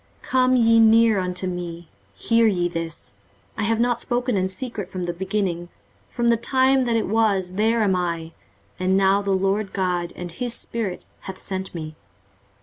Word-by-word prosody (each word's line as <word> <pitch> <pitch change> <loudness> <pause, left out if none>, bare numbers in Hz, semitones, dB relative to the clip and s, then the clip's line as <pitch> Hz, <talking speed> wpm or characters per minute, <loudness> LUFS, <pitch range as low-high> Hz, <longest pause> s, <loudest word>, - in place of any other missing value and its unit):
23:048:016 - - -13
Come 255 0 +4
ye 230 -2 +5
near 225 -1 +5
unto 180 0 -2
me, 175 -2 -5 0.3
hear 230 - +3
ye 175 -4 +1
this; 165 -6 -5 0.4
I 220 - -2
have 225 +1 +1
not 240 0 +1
spoken 245 -1 0
in 190 -1 0
secret 205 -1 -5
from 185 -1 -4
the 175 0 -2
beginning; 185 -2 -2 0.4
from 235 0 0
the 235 - +4
time 260 +2 +2
that 235 -1 +1
it 225 - +1
was, 200 -4 +1
there 220 +3 +2
am 195 -3 +2
I: 170 -2 -2 0.5
and 185 +1 +2
now 195 +1 +3
the 200 - -4
Lord 195 +1 0
GOD, 180 -2 -1
and 175 -1 -7
his 240 +5 -4
Spirit, 215 -8 -4 0.2
hath 190 -1 -8
sent 190 -1 -5
me. 155 -2 -6
195 Hz, 180 wpm, -23 LUFS, 180-230 Hz, 0.5 s, ye